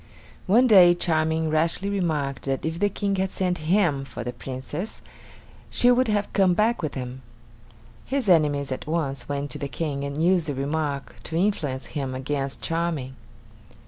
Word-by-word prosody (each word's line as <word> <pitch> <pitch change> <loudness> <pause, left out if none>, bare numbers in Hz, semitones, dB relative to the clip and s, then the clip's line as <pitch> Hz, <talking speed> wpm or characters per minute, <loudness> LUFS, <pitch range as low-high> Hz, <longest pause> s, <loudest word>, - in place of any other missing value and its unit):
One 230 +7 +5
day 185 -7 +7
Charming 160 -2 0
rashly 165 +5 +1
remarked 155 -9 -1
that 135 +1 -2
if 160 +1 -3
the 205 +1 +3
King 200 0 -2
had 190 0 0
sent 180 -2 -1
him 170 -8 +3
for 125 -2 -7
the 125 +1 -4
Princess, 135 - -6 0.7
she 245 - +4
would 255 +1 +3
have 210 -1 -1
come 190 -3 +4
back 220 +2 +2
with 155 -3 -3
him. 130 0 -6 0.8
His 270 -4 -2
enemies 145 -6 +3
at 130 - -4
once 140 -6 -2
went 140 -1 -3
to - - -5
the 140 - -3
King 140 -1 -3
and 140 +1 -4
used 175 -2 +3
the 145 - -2
remark 140 0 -3
to 160 - -4
influence 150 - 0
him 135 -4 -4
against 135 +1 -3
Charming. 165 -6 -2
160 Hz, 170 wpm, -25 LUFS, 140-185 Hz, 0.8 s, day